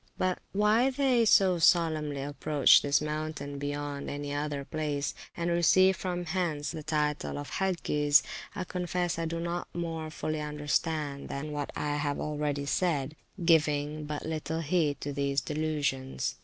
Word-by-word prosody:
But 185 Hz, -1 st, 0 dB
why 210 Hz, +5 st, +3 dB
they 260 Hz, -3 st, +2 dB
so 190 Hz, -4 st, +5 dB
solemnly 155 Hz, -4 st, +3 dB
approach 145 Hz, 0 st, +4 dB
this 145 Hz, +1 st, +2 dB
mountain 150 Hz, -2 st, -4 dB
beyond 145 Hz, 0 st, -4 dB
any 145 Hz, 0 st, -4 dB
other 145 Hz, -1 st, -2 dB
place, 150 Hz, -2 st, -2 dB, 0.2 s
and 170 Hz, 0 st, 0 dB
receive 185 Hz, +3 st, +5 dB
from 180 Hz, -2 st, -3 dB
hence 160 Hz, -5 st, -1 dB
the 155 Hz, -, -6 dB
title 150 Hz, -1 st, -1 dB
of 145 Hz, 0 st, -6 dB
Hagges, 150 Hz, -6 st, +2 dB, 0.3 s
I 185 Hz, -, -2 dB
confess 180 Hz, -1 st, -2 dB
I 165 Hz, -, -1 dB
do 165 Hz, +1 st, -3 dB
not 170 Hz, +1 st, -3 dB
more 165 Hz, -2 st, -3 dB
fully 155 Hz, 0 st, -3 dB
understand 150 Hz, -1 st, -2 dB
than 150 Hz, +2 st, -4 dB
what 145 Hz, -1 st, -3 dB
I 145 Hz, 0 st, -1 dB
have 145 Hz, -1 st, -1 dB
already 150 Hz, -1 st, -2 dB
said, 150 Hz, -3 st, 0 dB, 0.3 s
giving 150 Hz, -2 st, +2 dB
but 150 Hz, 0 st, -5 dB
little 160 Hz, +1 st, -3 dB
heed 155 Hz, -3 st, +1 dB
to 145 Hz, -, -3 dB
these 140 Hz, 0 st, 0 dB
delusions. 145 Hz, -4 st, -2 dB
150 Hz, 150 wpm, -29 LUFS, 145-170 Hz, 0.3 s, so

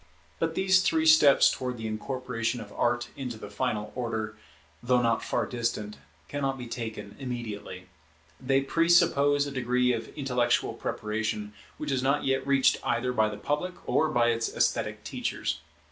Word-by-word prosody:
But 165 Hz, 0 st, -1 dB
these 190 Hz, 0 st, +4 dB
three 160 Hz, -3 st, +2 dB
steps 155 Hz, -3 st, +7 dB
towards 125 Hz, -1 st, -4 dB
the 110 Hz, -, -6 dB
incorporation 115 Hz, +1 st, -3 dB
of -, -, -9 dB
Art 120 Hz, 0 st, 0 dB
into 125 Hz, -4 st, -5 dB
the 105 Hz, -, -9 dB
final 105 Hz, +1 st, -2 dB
order, 110 Hz, -3 st, -3 dB, 0.5 s
though 125 Hz, +1 st, +3 dB
not 115 Hz, -1 st, +1 dB
far 120 Hz, -, 0 dB
distant, 115 Hz, -3 st, -3 dB, 0.3 s
cannot 135 Hz, -2 st, -2 dB
be 125 Hz, -, -6 dB
taken 110 Hz, -3 st, -6 dB
immediately. 110 Hz, -8 st, -6 dB, 0.5 s
They 135 Hz, +1 st, +2 dB
presuppose 145 Hz, -2 st, +3 dB
a 140 Hz, -, -5 dB
degree 125 Hz, -1 st, +1 dB
of 115 Hz, -1 st, -4 dB
intellectual 125 Hz, -4 st, +1 dB
preparation 105 Hz, -1 st, -3 dB, 0.2 s
which 150 Hz, -1 st, -3 dB
is 130 Hz, -2 st, +1 dB
not 140 Hz, +3 st, +1 dB
yet 135 Hz, 0 st, 0 dB
reached 135 Hz, -2 st, +4 dB
either 125 Hz, +2 st, 0 dB
by 110 Hz, -3 st, +2 dB
the 105 Hz, -, -6 dB
public 165 Hz, +9 st, -2 dB
or 155 Hz, -, +2 dB
by 120 Hz, -5 st, +3 dB
its 115 Hz, -1 st, 0 dB
esthetic -, -, 0 dB
teachers. -, -, -3 dB
125 Hz, 160 wpm, -28 LUFS, 115-140 Hz, 0.5 s, steps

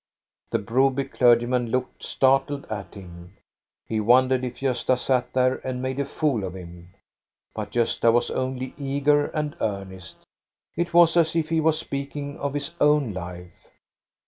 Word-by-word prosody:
The -, -, +1 dB
Broby 130 Hz, +5 st, +1 dB
clergyman 120 Hz, 0 st, +2 dB
looked 125 Hz, +2 st, -3 dB
startled 135 Hz, +1 st, +1 dB
at 105 Hz, -1 st, -6 dB
him. 90 Hz, -1 st, -12 dB, 0.5 s
He 110 Hz, -, -2 dB
wondered 130 Hz, +3 st, +3 dB
if 125 Hz, -, -5 dB
Gosta 130 Hz, -1 st, +1 dB
sat 125 Hz, 0 st, 0 dB
there 130 Hz, 0 st, +2 dB
and 130 Hz, -1 st, -5 dB
made 130 Hz, +1 st, -3 dB
a 140 Hz, -, 0 dB
fool 140 Hz, -6 st, -1 dB
of 95 Hz, -1 st, -5 dB
him. 90 Hz, 0 st, -12 dB, 0.6 s
But 105 Hz, -2 st, -6 dB
Gosta 115 Hz, -1 st, +2 dB
was 120 Hz, +1 st, +1 dB
only 130 Hz, 0 st, -3 dB
eager 145 Hz, +1 st, +1 dB
and 150 Hz, -2 st, -3 dB
earnest 95 Hz, -4 st, -5 dB, 0.5 s
It 170 Hz, +1 st, -2 dB
was 170 Hz, -1 st, +6 dB
as 165 Hz, -1 st, +3 dB
if 160 Hz, -2 st, 0 dB
he 165 Hz, -1 st, +1 dB
was 160 Hz, 0 st, +2 dB
speaking 140 Hz, -1 st, -5 dB
of 140 Hz, 0 st, -3 dB
his 145 Hz, +3 st, -3 dB
own 150 Hz, -6 st, +3 dB
life. 90 Hz, -1 st, -9 dB
130 Hz, 155 wpm, -24 LUFS, 110-140 Hz, 0.6 s, was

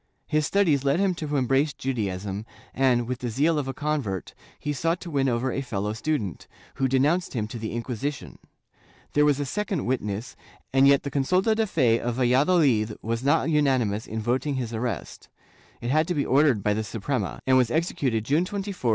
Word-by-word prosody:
His 155 Hz, -1 st, +1 dB
studies 165 Hz, -9 st, +2 dB
led 140 Hz, +4 st, +2 dB
him 195 Hz, -2 st, +2 dB
to 155 Hz, -3 st, -4 dB
embrace 135 Hz, +3 st, +2 dB
Judaism 100 Hz, -5 st, -3 dB, 0.3 s
and, 125 Hz, -3 st, +2 dB
with 125 Hz, 0 st, -3 dB
the 125 Hz, -, -3 dB
zeal 150 Hz, +7 st, +2 dB
of 140 Hz, -, -3 dB
a 135 Hz, -, -3 dB
convert, 145 Hz, -, -2 dB, 0.2 s
he 150 Hz, -, -3 dB
sought 165 Hz, +4 st, 0 dB
to 170 Hz, -, -7 dB
win 135 Hz, -2 st, +1 dB
over 125 Hz, +2 st, 0 dB
a 135 Hz, -, -2 dB
fellow 105 Hz, -5 st, -3 dB
student, 115 Hz, -, -3 dB, 0.3 s
who 135 Hz, -, +2 dB
denounced 145 Hz, +8 st, +1 dB
him 110 Hz, -3 st, -1 dB
to 115 Hz, -, -6 dB
the 110 Hz, +1 st, -3 dB
Inquisi 125 Hz, +4 st, -2 dB
tion. 145 Hz, -, -12 dB, 0.7 s
There 150 Hz, 0 st, +4 dB
was 145 Hz, -1 st, +3 dB
a 145 Hz, -, -1 dB
second 195 Hz, +2 st, -2 dB
witness, 115 Hz, -3 st, -2 dB, 0.4 s
and 135 Hz, +1 st, +6 dB
yet 140 Hz, 0 st, +5 dB
the 140 Hz, -, -4 dB
consulta 180 Hz, -, +2 dB
de 220 Hz, 0 st, 0 dB
fe 120 Hz, -, +2 dB
of 120 Hz, 0 st, -2 dB
Valladolid 130 Hz, -3 st, +3 dB
was 115 Hz, +2 st, -2 dB
not 160 Hz, +3 st, +2 dB
unanimous 130 Hz, -8 st, +1 dB
in 110 Hz, -, -4 dB
voting 130 Hz, +6 st, 0 dB
his 120 Hz, -3 st, -3 dB
arrest; 115 Hz, +1 st, -4 dB, 0.5 s
it 120 Hz, -, -2 dB
had 155 Hz, +2 st, +3 dB
to 180 Hz, -, -1 dB
be 140 Hz, -, 0 dB
ordered 135 Hz, -7 st, +3 dB
by 105 Hz, -, +2 dB
the 110 Hz, +1 st, -1 dB
Suprema, 105 Hz, -, -3 dB
and 130 Hz, -, +4 dB
was 125 Hz, -3 st, +4 dB
executed 135 Hz, -, 0 dB
June 150 Hz, +7 st, +2 dB
24, 200 Hz, +3 st, -5 dB, 0.2 s
1639. 130 Hz, -10 st, -2 dB
135 Hz, 200 wpm, -25 LUFS, 115-150 Hz, 0.7 s, and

